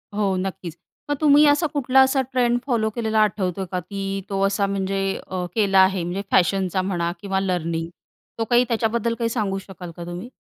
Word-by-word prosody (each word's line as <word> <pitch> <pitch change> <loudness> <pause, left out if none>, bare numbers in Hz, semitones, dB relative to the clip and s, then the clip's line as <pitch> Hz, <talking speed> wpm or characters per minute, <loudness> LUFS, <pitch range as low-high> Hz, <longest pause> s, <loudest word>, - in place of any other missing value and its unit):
हो 200 -2 +1
नक्कीच. 185 -3 -5 0.3
मग 290 - +1
तुम्ही 295 0 +6
असा 295 +3 +3
कुठला 265 -2 +4
असा 265 0 +3
ट्रेंड 245 -1 +2
फॉलो 230 -5 +1
केलेला 220 -2 0
आठवतोय 190 -2 0
का, 180 - -1
की 195 +2 -4
तो 195 -1 -1
असा 200 0 0
म्हणजे 195 0 -2 0.3
अ, 180 -1 -3
केला 200 -3 +3
आहे 190 -2 +3
म्हणजे 180 +3 -3
फॅशनचा 185 0 +2
म्हणा 175 -3 -1
किंवा 195 -1 -1
लर्निंग 170 -3 -2 0.5
तो - - +2
काही 240 +1 +5
त्याच्याबद्दल 230 0 0
काही 230 -1 0
सांगू 210 -5 -1
शकाल 185 -2 -10
का 175 - -6
तुम्ही? 175 +7 -7
195 Hz, 185 wpm, -22 LUFS, 185-230 Hz, 0.5 s, तुम्ही